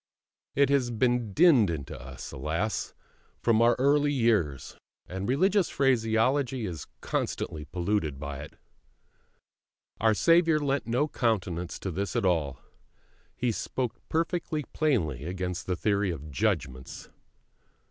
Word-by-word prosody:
It 140 Hz, -1 st, +4 dB
has 135 Hz, -3 st, +2 dB
been 120 Hz, -1 st, +1 dB
dinned 135 Hz, -, +5 dB
into 75 Hz, -5 st, -4 dB
us, 65 Hz, 0 st, -9 dB
alas, 80 Hz, +10 st, -2 dB, 0.4 s
from 115 Hz, -1 st, +3 dB
our 120 Hz, +1 st, +5 dB
early 145 Hz, +2 st, +3 dB
years, 110 Hz, -, +1 dB, 0.3 s
and 95 Hz, +4 st, -5 dB
religious 190 Hz, +8 st, +3 dB
phraseology 125 Hz, 0 st, +1 dB
is 85 Hz, -5 st, -6 dB
constantly 75 Hz, -1 st, -3 dB
polluted 85 Hz, -2 st, -1 dB
by 70 Hz, -1 st, -5 dB
it. 75 Hz, -, -9 dB, 1.4 s
Our 110 Hz, 0 st, +3 dB
Saviour 165 Hz, -, +4 dB
lent 140 Hz, -3 st, -1 dB
no 125 Hz, +6 st, +1 dB
countenance 95 Hz, -, -1 dB
to 95 Hz, -, -3 dB
this 100 Hz, +7 st, -3 dB
at 115 Hz, -4 st, +1 dB
all; 75 Hz, -7 st, +1 dB, 0.8 s
He 120 Hz, -1 st, 0 dB
spoke 125 Hz, +2 st, -3 dB
perfectly 165 Hz, -1 st, -1 dB
plainly 85 Hz, -, 0 dB
against 90 Hz, 0 st, -4 dB
the 90 Hz, -, 0 dB
theory 100 Hz, +1 st, +1 dB
of 75 Hz, -3 st, -6 dB
"judgments." 65 Hz, 0 st, -2 dB
110 Hz, 125 wpm, -28 LUFS, 85-135 Hz, 1.4 s, dinned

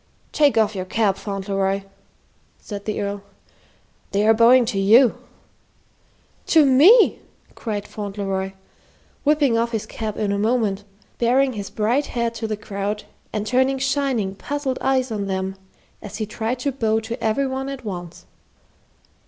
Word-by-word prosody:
"Take 290 Hz, -6 st, +3 dB
off 215 Hz, -1 st, +3 dB
your 185 Hz, -2 st, -4 dB
cap, 205 Hz, 0 st, +1 dB
Fauntleroy," 195 Hz, -1 st, -2 dB, 0.7 s
said 205 Hz, -2 st, -8 dB
the 215 Hz, -, -2 dB
Earl. 200 Hz, 0 st, -3 dB, 0.9 s
"They 200 Hz, +1 st, +1 dB
are 220 Hz, -, +6 dB
bowing 235 Hz, +2 st, +6 dB
to 220 Hz, -4 st, -2 dB
you." 225 Hz, +6 st, +5 dB, 1.3 s
"To 315 Hz, -3 st, +5 dB
me!" 325 Hz, -, +6 dB, 0.3 s
cried 210 Hz, -3 st, -4 dB
Fauntleroy, 195 Hz, -2 st, -4 dB, 0.7 s
whipping 285 Hz, -6 st, +3 dB
off 235 Hz, +1 st, -1 dB
his 220 Hz, -, -2 dB
cap 215 Hz, -2 st, -5 dB
in 205 Hz, -2 st, -1 dB
a 200 Hz, -, -1 dB
moment, 215 Hz, -3 st, 0 dB, 0.3 s
baring 255 Hz, +3 st, +3 dB
his 205 Hz, -3 st, -6 dB
bright 235 Hz, +7 st, 0 dB
head 235 Hz, -1 st, -2 dB
to 225 Hz, -1 st, -4 dB
the 215 Hz, -1 st, -3 dB
crowd 205 Hz, 0 st, -4 dB, 0.3 s
and 210 Hz, -1 st, -3 dB
turning 260 Hz, +4 st, +2 dB
shining, 265 Hz, -7 st, 0 dB
puzzled 275 Hz, +5 st, -3 dB
eyes 260 Hz, -2 st, +1 dB
on 205 Hz, -2 st, -3 dB
them 190 Hz, 0 st, -2 dB, 0.5 s
as 210 Hz, 0 st, -8 dB
he 220 Hz, -, -2 dB
tried 225 Hz, +3 st, -3 dB
to 280 Hz, -, 0 dB
bow 225 Hz, -4 st, 0 dB
to 230 Hz, +1 st, -6 dB
every 225 Hz, +5 st, +1 dB
one 265 Hz, +1 st, -3 dB
at 270 Hz, -3 st, -7 dB
once. 175 Hz, -4 st, -7 dB
220 Hz, 150 wpm, -22 LUFS, 200-255 Hz, 1.3 s, are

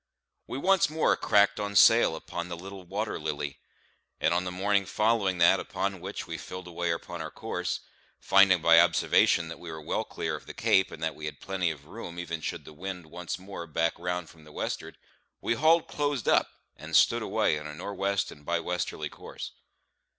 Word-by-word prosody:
We -, -, -4 dB
once 190 Hz, +2 st, +3 dB
more 155 Hz, +1 st, +2 dB
cracked 100 Hz, +1 st, +3 dB
on 100 Hz, -1 st, -3 dB
sail 115 Hz, -2 st, +6 dB
upon 85 Hz, +2 st, -6 dB
the 85 Hz, -, -5 dB
little 95 Hz, +2 st, -9 dB
Water 105 Hz, +4 st, -3 dB
Lily; 75 Hz, -2 st, -4 dB, 0.6 s
and 85 Hz, -, +2 dB
on 90 Hz, +1 st, 0 dB
the 90 Hz, -, -3 dB
morning 100 Hz, +1 st, +1 dB
following 105 Hz, -4 st, +1 dB
that 85 Hz, 0 st, +5 dB
upon 95 Hz, -2 st, -3 dB
which 95 Hz, +3 st, -5 dB
we 85 Hz, -2 st, -6 dB
filled 90 Hz, 0 st, -8 dB
away 85 Hz, 0 st, -3 dB
upon 85 Hz, 0 st, -3 dB
our -, -, -5 dB
course, -, -, -3 dB, 0.4 s
finding 95 Hz, -3 st, +5 dB
by 85 Hz, 0 st, +8 dB
observation 85 Hz, -1 st, +4 dB
that 85 Hz, -, -8 dB
we 85 Hz, -2 st, -8 dB
were 80 Hz, -, -7 dB
well 75 Hz, -, -2 dB
clear -, -, -3 dB
of -, -, -11 dB
the -, -, -8 dB
Cape, 95 Hz, -, +3 dB
and 80 Hz, -, -9 dB
that 80 Hz, -1 st, 0 dB
we 75 Hz, -, -6 dB
had 75 Hz, -2 st, -7 dB
plenty 95 Hz, -3 st, -1 dB
of 75 Hz, -3 st, -7 dB
room 85 Hz, -1 st, -8 dB
even 85 Hz, -2 st, -4 dB
should -, -, -4 dB
the 80 Hz, -, -11 dB
wind 90 Hz, +1 st, -6 dB
once 90 Hz, 0 st, -4 dB
more 95 Hz, -2 st, -8 dB
back 80 Hz, +1 st, +1 dB
round 90 Hz, -1 st, -3 dB
from 80 Hz, -1 st, -17 dB
the 75 Hz, -, -15 dB
westward, -, -, -4 dB, 0.4 s
we -, -, 0 dB
hauled 160 Hz, +5 st, +4 dB
close 145 Hz, -5 st, -1 dB
up, -, -, +3 dB, 0.3 s
and -, -, -5 dB
stood -, -, +5 dB
away 75 Hz, -, +1 dB
on 75 Hz, -, -7 dB
a 75 Hz, -, -8 dB
nor' 100 Hz, -, -6 dB
west 100 Hz, 0 st, 0 dB
and 75 Hz, -, -14 dB
by 85 Hz, +3 st, 0 dB
westerly 90 Hz, +1 st, -3 dB
course. -, -, -9 dB
90 Hz, 205 wpm, -28 LUFS, 85-100 Hz, 0.6 s, by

